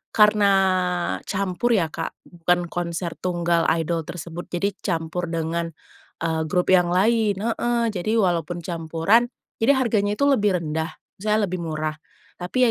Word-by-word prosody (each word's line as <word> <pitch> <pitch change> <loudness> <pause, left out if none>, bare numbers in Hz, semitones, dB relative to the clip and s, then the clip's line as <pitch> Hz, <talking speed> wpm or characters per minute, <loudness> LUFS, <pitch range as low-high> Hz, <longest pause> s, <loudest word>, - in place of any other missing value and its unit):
karena 210 -1 +5 0.8
campur 200 +4 0
ya 165 -6 +1
Kak, - - -5
bukan 175 +1 0
konser 170 0 -3
tunggal 175 -2 +1
idol 165 -1 -2
tersebut. 175 +1 -7
Jadi, 200 +3 -1
campur 170 -1 -2
dengan, 165 0 -2 0.6
eee, 160 -1 0
grup 180 +3 +1
yang 180 -2 +5
lain 215 +1 +3
heeh. 235 +3 0
Jadi 210 +3 -1
walaupun 175 -4 0
campuran, 165 +7 +2 0.3
jadi 255 +5 +4
harganya 210 -5 +1
itu 280 - -1
lebih 210 -9 +3
rendah, 160 +2 -3 0.2
misalnya 215 +2 +1
lebih 185 -2 -2
murah, 155 0 -2 0.4
tapi 185 +9 0
180 Hz, 135 wpm, -23 LUFS, 165-210 Hz, 0.8 s, karena